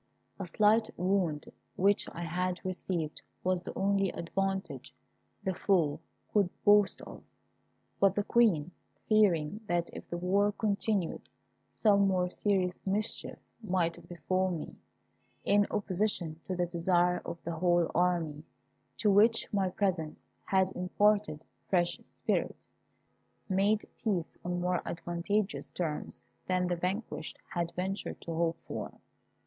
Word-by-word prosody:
A 195 - -4
slight 215 +5 +3
wound 180 -5 0 0.2
which 200 +2 +2
I 170 - -6
had 180 +2 -2
received 180 -4 -3 0.2
was 185 -1 +1
the - - -7
only 195 0 +2
advantage 170 -8 -3 0.5
the 190 - 0
foe 165 -6 +2 0.3
could 200 -4 +3 0.2
boast 205 -1 +5
of; - - -10 0.8
but 195 -1 +4
the 205 - +1
Queen, 200 -10 +3 0.4
fearing 205 -3 +3
that 175 -2 0
if - - -9
the 175 - -3
war 200 +4 +2
continued 205 -3 -1 0.4
some 200 -2 +4
more 180 -2 +1
serious 190 -3 0
mischief 205 +3 0 0.2
might 180 -5 -1
befal 185 +3 0
me, 170 -4 -5 0.7
in 205 0 +4
opposition 185 -5 -1
to 185 - -2
the 175 0 +1
desire 175 +1 +2
of 170 - -5
the 170 - -3
whole 175 0 +2
army, 170 -4 +1 0.5
to 205 +1 +3
which 220 +4 +4
my 195 -2 +2
presence 180 -5 -2 0.2
had 190 -1 +2
imparted 200 -2 +1 0.3
fresh 175 -2 +2
spirit, - - -2 0.9
made 200 +2 +2 0.2
peace 185 -7 -1
on 175 0 -2
more 180 0 +1
advantageous 180 +5 -2
terms 160 -4 -4 0.2
than 185 0 +1
the 180 0 0
vanquished 185 +6 -3 0.2
had 170 -1 -1
ventured 190 +2 -3
to 165 - -5
hope 165 0 0
for. - - -4
185 Hz, 130 wpm, -31 LUFS, 170-200 Hz, 0.9 s, boast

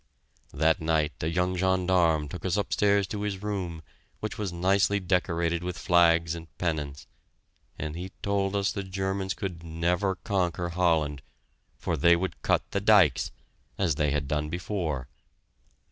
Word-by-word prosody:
That 80 +2 +2
night 80 -1 +1
a 75 - -1
young 90 +2 0
gendarme 90 -4 +2
took 85 +2 -8
us 95 +1 0
upstairs 100 0 +2
to 100 +2 -5
his 105 -1 -3
room, 90 -6 -3 0.4
which 110 - -4
was 100 -4 -3
nicely 95 +3 +2
decorated 85 -2 0
with 90 -1 -4
flags 85 -1 +4
and 85 -1 -7
pennants, 75 -5 -3 0.7
and 75 +1 -4
he 90 +2 -6
told 100 -1 0
us 100 -1 +1
the 100 - -3
Germans 95 0 -2
could 90 -3 -5
never 85 +4 0
conquer 90 -2 -1
Holland, 80 -5 +1 0.6
for - - -2
they 85 +5 +5
would 95 +2 -3
cut - - +2
the 100 - 0
dykes 100 - +5 0.5
as 90 -5 +2
they 75 +1 +1
had 70 -1 -1
done 75 +1 -1
before. 85 - -3
90 Hz, 150 wpm, -28 LUFS, 80-95 Hz, 0.7 s, they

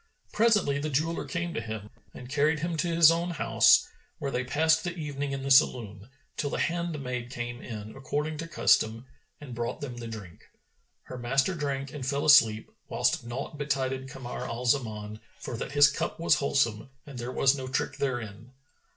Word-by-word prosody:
Presently 210 -11 +3
the 155 +2 -2
jeweller 155 +4 -1
came 170 0 -3
to - - -2
him 110 -2 -7 0.2
and 125 - -10
carried 150 +3 +1
him 170 0 -2
to 175 - 0
his 165 -1 +6
own 170 +1 -1
house, 175 - +4 0.3
where 140 -5 -3
they 125 - -1
passed 160 +5 +2
the 175 -1 -3
evening 145 -3 -4
in 135 -1 -4
the 135 - -2
saloon, 110 -5 +3 0.3
till 145 - -1
the - - -3
handmaid 145 -8 -2
came 120 0 -5
in 110 -2 -8
according 150 +3 -3
to 165 - -4
custom, 115 -7 +2 0.3
and 140 -4 -9
brought 120 0 -3
them 125 -4 -6
the 120 -1 -6
drink. 100 -7 -10 0.5
Her 125 - -8
master 135 +8 +1
drank 140 -4 -3
and 145 -3 -6
fell 140 +3 -1
asleep, 110 -7 +5 0.2
whilst - - +1
naught 135 +5 -6
betided 135 -2 -2
Kamar 130 -2 -6
al 120 +2 -5
Zaman 110 -5 -1 0.2
for - - -6
that 135 - -5
his 145 0 +7
cup - - -3
was 170 - +4
wholesome 130 -4 0 0.2
and 140 -4 -9
there 120 +1 -4
was 135 +1 +3
no 130 -2 -6
trick 130 +1 -2
therein. 120 -3 -4
135 Hz, 185 wpm, -28 LUFS, 120-150 Hz, 0.5 s, his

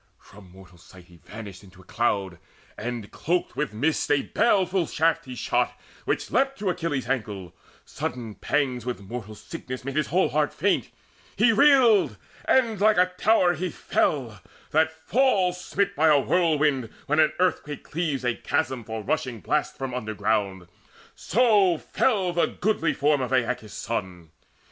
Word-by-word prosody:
From 95 -2 -16
mortal 90 -1 -16
sight 90 +1 -16
he 90 -1 -18
vanished 100 +2 -10
into 95 -1 -17
cloud, 95 -4 -1 0.4
And 115 -2 -5
cloaked 175 +3 -2
with 150 - -2
mist 145 +9 0
a 145 -1 +3
baleful 190 -6 +1
shaft 160 -1 +1
he 130 -1 -8
shot - - -1 0.3
Which - - -2
leapt 270 +1 +1
to 200 -6 0
Achilles' 160 -6 -3
ankle: 105 -8 -3 0.3
sudden 120 -3 -5
pangs 125 +4 -1
With 125 -2 -4
mortal 110 +1 -7
sickness 130 -1 -8
made 135 0 -4
his 155 -1 +1
whole 185 +4 +2
heart 150 -1 0
faint. 200 - +1 0.5
He 230 - +4
reeled, 245 -5 +5 0.3
and 230 -6 +2
like 215 -1 +4
a 180 0 +3
tower 185 -3 +3
he 180 +3 -3
fell, 120 - -1 0.3
that 160 +1 +3
falls 180 0 +1
Smit 200 0 -1
by 160 +2 +3
a 150 -2 +6
whirlwind 150 -6 +1 0.2
when 150 +2 +1
an 155 -1 +4
earthquake 175 -5 -1
cleaves 150 -5 -3
A 120 - +2
chasm 125 +1 -2
for 110 0 -6
rushing 130 -4 -2
blasts 150 +5 -1
from 135 -2 -4
underground; 105 -5 -2 0.5
So 205 -6 +3
fell 190 -1 0
the 170 - +2
goodly 200 -4 0
form 145 -1 +2
of 125 0 -3
Aeacus' 120 -4 -1
son. 90 -8 -5
145 Hz, 155 wpm, -25 LUFS, 110-180 Hz, 0.5 s, a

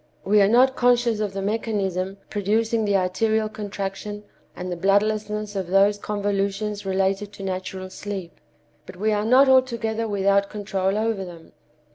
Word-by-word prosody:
We 210 +1 +4
are 195 - +5
not 255 +5 +4
conscious 240 -2 +2
of 210 -2 -2
the 195 0 -3
mechanism 195 -3 -2
producing 220 +2 0
the 200 -1 +1
arterial 215 +4 +1
contraction 205 -1 -5 0.3
and 180 0 -5
the - - -2
bloodlessness 210 +3 0
of 190 -3 -2
those 200 +2 +3
convolutions 205 0 -2
related 195 +1 0
to 195 - -9
natural 185 0 -5
sleep. 195 -5 -7 0.5
But - - -10
we 215 +4 0
are 210 0 +1
not 255 +4 +6
altogether 235 -4 +2
without 200 -1 +2
control 195 -1 -1
over 220 -2 -1
them. 170 -3 -11
205 Hz, 150 wpm, -23 LUFS, 195-215 Hz, 0.5 s, not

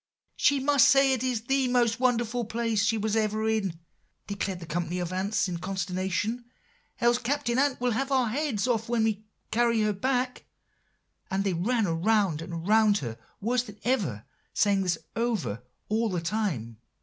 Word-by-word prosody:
"'She 285 -1 +3
must 280 0 +5
say 275 -1 +5
it 255 - -1
is 250 -4 0
the 270 +1 +1
most 240 -2 +2
wonderful 240 -1 +1
place 225 -1 0
she 225 +1 +2
was 215 0 -1
ever 215 0 0
in,' 200 -6 0 0.5
declared 200 -3 -3
the 170 - -8
company 170 +2 -2
of 180 0 -3
ants 195 +3 0
in 175 -2 -4
consternation, 190 +5 -2 0.6
'else 240 +1 +3
Captain 255 0 0
Ant 280 -1 +1
will 245 0 +1
have 270 +5 -1
our 255 -4 +2
heads 255 -3 -1
off 230 -2 0
when 235 -2 +2
we 215 -1 0 0.3
carry 230 0 +2
her 215 0 +1
back;' 250 +4 -1 0.8
and 195 +1 0
they 195 -2 0
ran 220 +6 +1 0.2
round 200 -6 +2
and 165 +1 -6
round 215 -1 +5
her 120 - -5 0.3
worse 240 +4 +1
than 210 -4 -12
ever, 185 - -1 0.3
saying 200 -2 +3
this 180 -3 0 0.2
over 210 - -1 0.3
all 220 +1 +1
the 180 -3 -1
time. 165 - -2
220 Hz, 175 wpm, -27 LUFS, 190-245 Hz, 0.8 s, must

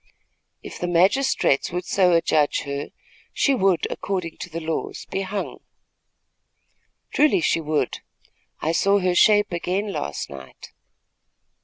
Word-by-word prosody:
"If - - -9
the 175 - -2
magistrates 180 - +2
would 180 +1 -3
so 180 -2 +3
adjudge 155 -3 +2
her, 140 0 -5 0.4
she 280 - +2
would, 195 -8 +2
according 180 -4 -4
to 185 - -7
the 165 0 -5
laws, 160 -1 -4
be 195 - -1
hung." 195 +1 -4 1.5
"Truly 295 -11 +4
she 165 - +1
would. 155 -1 -1 0.6
I 160 - +1
saw 200 +4 +3
her 185 -2 +1
shape 205 +2 +4
again 185 +4 -2
last 75 - -4
night." 65 -2 -12
180 Hz, 130 wpm, -23 LUFS, 160-195 Hz, 1.5 s, Truly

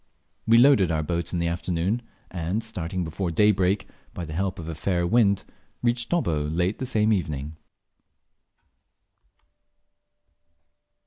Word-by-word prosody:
We 115 +1 +6
loaded 120 - +6
our 80 -1 0
boat 85 +2 -2
in 90 - -1
the 85 - 0
afternoon, 90 +5 -1 0.3
and, 90 +5 -2
starting 90 -5 -4
before 85 +3 -3
daybreak, 95 +1 +2 0.3
by 90 - -4
the 75 - -7
help 95 +3 -2
of 80 - -7
a 85 - -4
fair 85 +2 -1
wind 100 0 +3 0.4
reached 120 0 0
Dobbo 80 - 0
late 90 +5 0
the 130 - -2
same 110 -1 +2
evening. 75 -5 -3
90 Hz, 130 wpm, -25 LUFS, 85-105 Hz, 0.4 s, We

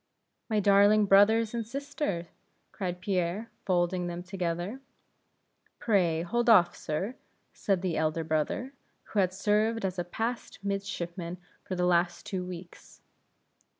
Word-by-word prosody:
"My 215 -1 +2
darling 205 +1 +5
brothers 210 +3 +5
and 235 -1 -1
sister!" 235 - -4 0.4
cried 180 -3 -4
Pierre, 185 +3 -1 0.2
folding 180 -1 +1
them 175 0 -5
together. 180 +5 -3 1.0
"Pray, 175 -7 +2
hold 240 +7 0
off, 180 -6 +6
sir," 180 +9 -3 0.4
said 190 -3 0
the 175 -4 0
elder 160 +1 0
brother, 160 - -1 0.4
who 210 - +2
had 185 -2 +3
served 210 +3 +1
as 185 -1 -2
a - - 0
passed 225 +7 -4
midshipman 180 -3 -4 0.3
for 185 - -4
the 180 0 +1
last 175 0 +1
two 185 -2 -3
weeks. 180 -1 -10
185 Hz, 130 wpm, -29 LUFS, 175-210 Hz, 1.0 s, off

